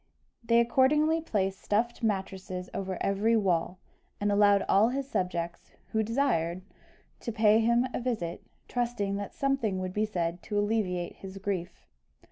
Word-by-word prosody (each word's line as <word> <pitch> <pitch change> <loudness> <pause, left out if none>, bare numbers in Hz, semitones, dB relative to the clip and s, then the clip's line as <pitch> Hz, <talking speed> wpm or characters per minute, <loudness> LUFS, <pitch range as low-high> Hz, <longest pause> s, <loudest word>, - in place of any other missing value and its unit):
They 230 0 +4
accordingly 300 +7 +3
placed 195 -9 -1
stuffed 235 +4 0
mattresses 190 -3 -3
over 190 -2 -3
every 205 +4 +2
wall, 180 -3 0 0.4
and 205 0 +1
allowed 205 -1 +4
all 210 +4 +5
his 270 +1 -3
subjects, 175 -7 -3 0.2
who 220 - +1
desired, 210 -8 0 0.6
to 235 - -4
pay 215 0 +4
him 235 +2 +3
a - - -1
visit, 225 -9 -3 0.3
trusting 235 -5 -1
that 200 -1 -6
something 270 -8 0
would 185 0 -3
be 210 +2 +1
said 175 -3 -2
to 205 - -4
alleviate 205 -4 -1
his 195 0 -9
grief. 190 -3 -4
205 Hz, 145 wpm, -29 LUFS, 185-235 Hz, 0.6 s, all